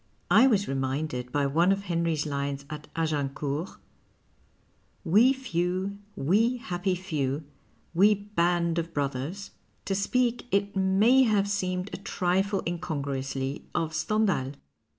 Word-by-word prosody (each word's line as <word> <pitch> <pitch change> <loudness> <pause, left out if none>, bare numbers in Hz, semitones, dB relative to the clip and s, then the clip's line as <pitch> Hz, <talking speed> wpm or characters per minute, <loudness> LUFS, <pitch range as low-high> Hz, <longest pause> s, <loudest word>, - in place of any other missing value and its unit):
I 225 +8 +7
was 205 -6 +2
reminded 135 -1 -2
by 145 0 +1
one 165 +7 +3
of 195 0 0
Henrys 170 -4 0
lines 140 -1 -3
at 150 -1 -7
Agincourt, 150 0 -2 1.3
We 215 +10 +5
few, 190 -5 -2 0.2
we 220 - +2
happy 180 -4 -2
few, 150 -5 -2 0.5
we 200 +5 +5
band 175 -4 0
of 165 0 -5
brothers, 145 +8 -3 0.3
to 195 - -1
speak, 240 +5 0
it 200 -1 0
may 195 +7 +4
have 210 -5 +3
seemed 185 -1 -2
a - - -3
trifle 190 +1 0
incongruously, 140 -5 -3
of 160 -1 0
Stendlial. 175 - 0
175 Hz, 120 wpm, -27 LUFS, 145-200 Hz, 1.3 s, I